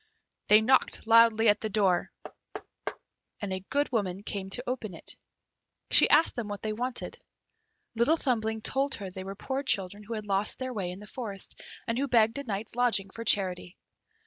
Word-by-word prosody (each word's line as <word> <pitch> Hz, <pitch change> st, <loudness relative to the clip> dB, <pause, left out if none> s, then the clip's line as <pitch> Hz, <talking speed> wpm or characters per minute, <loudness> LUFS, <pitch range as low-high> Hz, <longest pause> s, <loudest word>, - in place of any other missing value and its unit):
They 215 Hz, +1 st, +7 dB
knocked 260 Hz, +1 st, +2 dB
loudly 230 Hz, 0 st, +5 dB
at 210 Hz, 0 st, +4 dB
the 220 Hz, -, -2 dB
door, 195 Hz, -4 st, +1 dB, 1.3 s
and 205 Hz, -3 st, -4 dB
a 185 Hz, 0 st, -5 dB
good 285 Hz, 0 st, 0 dB
woman 200 Hz, -5 st, -2 dB
came 195 Hz, -2 st, -5 dB
to 245 Hz, +5 st, -3 dB
open 235 Hz, -7 st, -4 dB
it. -, -, -11 dB, 0.8 s
She -, -, +7 dB
asked 315 Hz, +2 st, +4 dB
them 240 Hz, -3 st, -4 dB
what 205 Hz, -1 st, -6 dB
they 215 Hz, -1 st, -2 dB
wanted. 245 Hz, +3 st, -5 dB, 0.7 s
Little 240 Hz, +8 st, +3 dB
Thumbling 220 Hz, -6 st, -1 dB
told 275 Hz, +1 st, 0 dB
her 195 Hz, -3 st, -7 dB
they 185 Hz, +1 st, -7 dB
were 195 Hz, +1 st, -7 dB
poor 265 Hz, +6 st, -3 dB
children 200 Hz, -6 st, +1 dB
who 220 Hz, +2 st, -6 dB
had 215 Hz, -1 st, -5 dB
lost 200 Hz, 0 st, 0 dB
their 260 Hz, -1 st, -4 dB
way 195 Hz, -5 st, -3 dB
in 180 Hz, -, -7 dB
the 210 Hz, -, -11 dB
forest, 210 Hz, -4 st, -7 dB, 0.3 s
and 230 Hz, +1 st, -1 dB
who 280 Hz, -, 0 dB
begged 230 Hz, 0 st, +3 dB
a -, -, -5 dB
night's 215 Hz, -2 st, -5 dB
lodging 230 Hz, -6 st, +2 dB
for 230 Hz, -, -6 dB
charity. 185 Hz, -4 st, +1 dB
220 Hz, 185 wpm, -28 LUFS, 195-245 Hz, 1.3 s, They